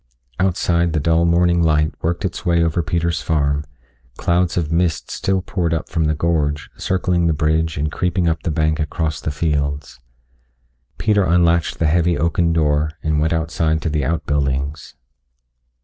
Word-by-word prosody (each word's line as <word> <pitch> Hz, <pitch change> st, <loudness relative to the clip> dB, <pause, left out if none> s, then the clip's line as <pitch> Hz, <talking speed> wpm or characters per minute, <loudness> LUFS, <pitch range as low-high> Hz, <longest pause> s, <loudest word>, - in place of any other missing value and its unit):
Outside 85 Hz, -2 st, +1 dB
the 80 Hz, -, +1 dB
dull 80 Hz, +3 st, +2 dB
morning 85 Hz, 0 st, +3 dB
light 75 Hz, -1 st, +2 dB
worked 85 Hz, +4 st, -1 dB
its 90 Hz, -, -4 dB
way 85 Hz, -2 st, +2 dB
over 85 Hz, +1 st, 0 dB
Peter's 85 Hz, 0 st, -1 dB
farm 75 Hz, -2 st, 0 dB, 0.5 s
clouds 85 Hz, 0 st, +1 dB
of 80 Hz, -3 st, -1 dB
mist 85 Hz, -1 st, 0 dB
still 95 Hz, -1 st, -1 dB
poured 85 Hz, -3 st, -1 dB
up 80 Hz, -, -4 dB
from 80 Hz, -1 st, 0 dB
the 75 Hz, 0 st, +1 dB
gorge, 75 Hz, -2 st, -1 dB
circling 90 Hz, -2 st, 0 dB
the 80 Hz, -, +2 dB
bridge 80 Hz, +1 st, 0 dB
and 75 Hz, +1 st, -1 dB
creeping 90 Hz, 0 st, 0 dB
up 80 Hz, -2 st, 0 dB
the -, -, -2 dB
bank 80 Hz, 0 st, 0 dB
across 80 Hz, 0 st, -2 dB
the -, -, -2 dB
fields. 70 Hz, -4 st, -2 dB, 1.0 s
Peter 105 Hz, -2 st, +2 dB
unlatched 85 Hz, -1 st, +2 dB
the 80 Hz, -, 0 dB
heavy 85 Hz, +2 st, +2 dB
oaken 85 Hz, +2 st, +1 dB
door 75 Hz, -2 st, +1 dB
and 80 Hz, -1 st, +1 dB
went 80 Hz, +1 st, +1 dB
outside 80 Hz, -1 st, 0 dB
to 80 Hz, -, 0 dB
the 75 Hz, -1 st, 0 dB
outbuildings. 70 Hz, -2 st, -2 dB
80 Hz, 165 wpm, -19 LUFS, 75-85 Hz, 1.0 s, morning